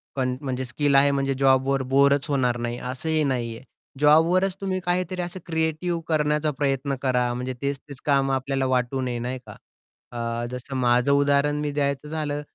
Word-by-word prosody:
कन 130 -2 0
म्हणजे 130 -2 -3
स्किल 140 +3 0
आहे 140 +1 +6
म्हणजे 135 -1 0
जॉबवर 135 0 +3
बोरच 140 0 +4
होणार 125 -4 +1
नाही 120 0 -3
असंही 150 +5 -1
नाहीये. 120 -4 -2 0.4
जॉबवरच 170 +6 +4
तुम्ही 190 -1 -1
काहीतरी 180 0 -1
असं 175 +1 -5
क्रिएटिव्ह 160 +1 -1
करण्याचा 150 -1 +1
प्रयत्न 140 -1 0
करा. 125 -2 +1
म्हणजे 125 +1 -3
तेच-तेच 140 -1 -4
काम 135 -2 +2
आपल्याला 135 0 -1
वाटू 130 +1 0
नये 125 -2 -2
नाही 125 +2 -4
का? - - -10 0.6
अ, 115 0 -3
जसं 125 +2 -6
माझं 125 +1 +3
उदाहरण 140 +1 +3
मी 150 -1 -2
द्यायचं 140 0 -1
झालं, 150 -2 -2
140 Hz, 165 wpm, -24 LUFS, 130-150 Hz, 0.6 s, आहे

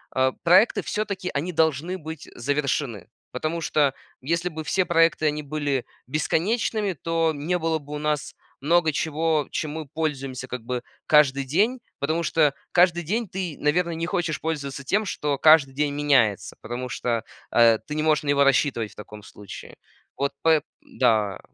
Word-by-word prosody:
э, 130 0 +3
проекты 185 +7 +5
всё-таки, 200 -4 -3
они 170 +5 -2
должны 160 +3 +1
быть 160 -2 -8
завершены. 135 - -2 0.2
Потому 155 +6 -3
что 145 -3 +2 0.3
если 170 +5 -1
бы 160 -1 -7
все 190 - +2
проекты 165 -2 +3
они 150 0 -1
были 145 -3 -2 0.2
бесконечными, 200 - 0
то 165 +2 0
не 155 +5 -1
было 160 -1 -1
бы 145 +1 -10
у 150 - -3
нас 150 -4 -2 0.3
много 160 +1 +3
чего, 160 -1 0
чем 155 -2 -3
мы 155 -2 -6
пользуемся 135 -5 -3
как 125 -1 -5
бы 125 0 -3 0.2
каждый 140 -3 +4
день. 215 - +1 0.2
Потому 160 +4 0
что 155 -3 +2 0.2
каждый 175 -1 +4
день 215 +7 -1
ты, 180 -5 -4
наверно, 170 +4 +1
не 165 0 -3
хочешь 175 -4 -1
пользоваться 140 -4 -4
тем, 210 +8 +1
что 145 -6 -2
каждый 155 -3 +6
день 145 0 0
меняется, 135 -8 +2
потому 125 +2 -5
что, 115 -2 -2 0.3
э, 115 -2 +5
ты 150 - -4
не 155 - -1
можешь 155 0 +2
на 145 - -3
него 140 0 +4
рассчитывать 135 -5 +1
в - - -28
таком 105 0 -11
случае. 105 -2 -11 0.4
Вот 140 0 0
поэ 160 -2 +4 0.2
Да. 110 - +1
150 Hz, 165 wpm, -24 LUFS, 140-165 Hz, 0.4 s, каждый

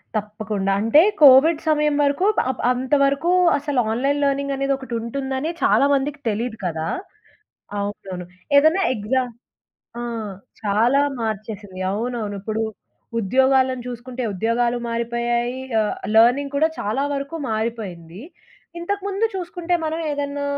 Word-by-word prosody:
తప్పకుండా. 210 -2 -2
అంటే 225 +8 +5 0.2
కోవిడ్ 295 +3 +7
సమయం 300 -1 +2
వరకు 285 +6 +1 0.2
అప్ 260 - -3
అంతవరకు 280 +5 +1 0.3
అసలు 285 -2 -1
ఆన్‌లైన్ 275 +5 0
లెర్నింగనేది 275 0 0
ఒకటుంటుందని 265 +3 -3
చాలామందికి 280 +1 +2
తెలీదు 225 +2 -3
కదా 160 -2 -2 0.9
అవునవును. 195 -3 -5 0.3
ఏదన్నా 315 +7 +4
ఎగ్జా 240 +5 0 0.8
ఆ! - - -4 0.6
చాలా 225 +7 +3 0.2
మార్చేసింది. 210 -3 -5
అవునవును. 220 -1 -3
ఇప్పుడు 215 +2 -2 0.6
ఉద్యోగాలను 260 +3 +2
చూసుకుంటే 250 +1 -6
ఉద్యోగాలు 235 +4 0
మారిపోయాయి. 235 +1 -1 0.2
ఆహ్, 215 -1 0 0.2
లెర్నింగ్ 255 +5 +4
కూడా 310 +3 +4
చాలా 220 +7 -1
వరకు 280 +3 -4 0.2
మారిపోయింది. 210 -6 -4 0.6
ఇంతకుముందు 400 +3 -1
చూసుకుంటే, 355 -1 -2
మనం 315 +1 -2
ఏదన్నా 285 0 -3
250 Hz, 105 wpm, -22 LUFS, 220-280 Hz, 0.9 s, కోవిడ్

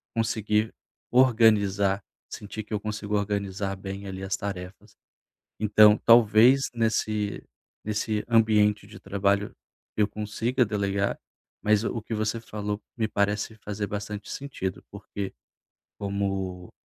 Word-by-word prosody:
conseguir 110 -1 0 0.4
organizar, 105 -6 +4 0.3
sentir 105 +1 -7
que 105 - -9
eu 105 - 0
consigo 105 0 -3
organizar 100 -1 -2
bem 95 +1 -7
ali 95 0 -6
as 95 0 -1
tarefas. 100 +2 -7 0.6
Então, 105 0 +6
talvez 115 +3 +7
nesse 110 -2 -1 0.4
nesse 105 0 -1
ambiente 105 -3 +3
de 105 - -12
trabalho 100 +1 0 0.4
eu 105 -1 +3
consiga 110 +4 -1
delegar, 100 -1 -1 0.5
mas 105 0 +3
o 115 - -2
que 110 - -6
você 110 +1 -1
falou 105 -2 -4 0.2
me 110 -2 +1
parece 105 +1 -1
fazer 105 -1 -4
bastante 105 0 -5
sentido, 130 -10 -5
porque 100 -1 -6 0.7
como, 95 -3 -3
105 Hz, 115 wpm, -26 LUFS, 100-110 Hz, 0.7 s, talvez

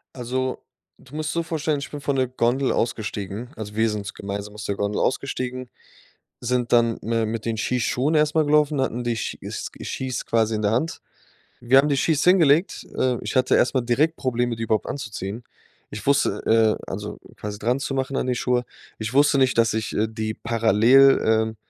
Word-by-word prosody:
Also, 130 +1 -3 0.3
du 135 +3 -15
musst 155 +1 -2
so 170 0 -1
vorstellen, 155 -2 -1
ich 140 - -7
bin 145 - -6
von 140 0 -1
der 130 -1 +1
Gondel 125 +2 +1
ausgestiegen, 110 0 -3
also 105 -1 -7
wir 110 +1 +2
sind 105 -1 -4
so 100 - -6
gemeinsam 100 +1 -6
aus 105 - -7
der 100 - -1
Gondel 100 +1 -1
ausgestiegen, 130 -1 -2 0.7
sind 125 0 -1
dann 115 -1 +3
mi 115 0 0
mit 110 0 -4
den 115 -1 -1
Skischuhen 125 +6 0
erstmal 150 +1 +3
gelaufen, 150 -1 +3
hatten 125 -2 -2
die 120 -1 -1
Schi 110 - -4
Ski - - -7
Skis 130 -2 -4
quasi 110 -1 +1
in 105 - -3
der 105 - +2
Hand. 150 +9 -1 0.6
Wir 125 +3 +5
haben 140 +2 +4
die 140 - +1
Skis 150 +2 +1
hingelegt. 170 -2 +3
Äh, 125 -2 +1
ich - - -4
hatte 130 - +4
erstmal 130 0 +2
direkt 145 +7 +1
Probleme, 120 -2 -1
die 115 - -5
überhaupt 110 -1 0
anzuziehen. 110 -4 -5 0.5
Ich 105 +6 -8
wusste, 110 -4 +2
äh - - -11
also - - -5 0.2
quasi 105 0 -6
dranzumachen 135 +3 -1
an - - -1
die 125 - +1
Schuhe 125 0 0 0.3
Ich 110 +2 -4
wusste 145 0 +4
nicht, 130 -3 +2
dass 115 -1 +3
ich, 110 -1 -2
äh, 110 - +1
die 110 0 -4
parallel, 115 +4 +4
ähm, 110 0 +1
125 Hz, 190 wpm, -23 LUFS, 110-135 Hz, 0.7 s, Wir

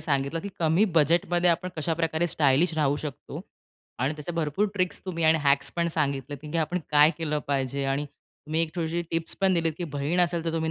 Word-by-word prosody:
सांगितलं, 140 +1 -1
की 200 - -6
कमी 165 +6 +3
बजेटमध्ये 175 +3 +3
आपण 175 +2 -1
कशाप्रकारे 165 +1 0
स्टायलिश 155 +2 +2
राहू 145 -1 +2
शकतो 145 -3 -7 0.6
आणि 145 +3 0
त्याचे 160 +4 -5
भरपूर 165 +5 0
ट्रिक्स 185 -3 -1
तुम्ही 170 -3 -2
आणि 160 0 +5
हॅक्स 140 0 +2
पण 170 0 +1
सांगितले, 140 -1 -1
की 150 +4 -6
आपण 180 +4 -2 0.2
काय 150 +2 +7
केलं 150 -2 -1
पाहिजे. 135 0 -1
आणि 145 +1 -2 0.4
तुम्ही 160 +2 0
एक 160 0 -4
छोटीशी 170 +1 -1
टिप्स 165 0 -2
पण 190 -1 +3
दिलीत, 165 -1 +1
की 175 - -2
बहीण 155 +6 0
असेल, 170 -1 +1
तर 165 - -1
तुम्ही 160 -1 -1
160 Hz, 195 wpm, -26 LUFS, 145-170 Hz, 0.6 s, काय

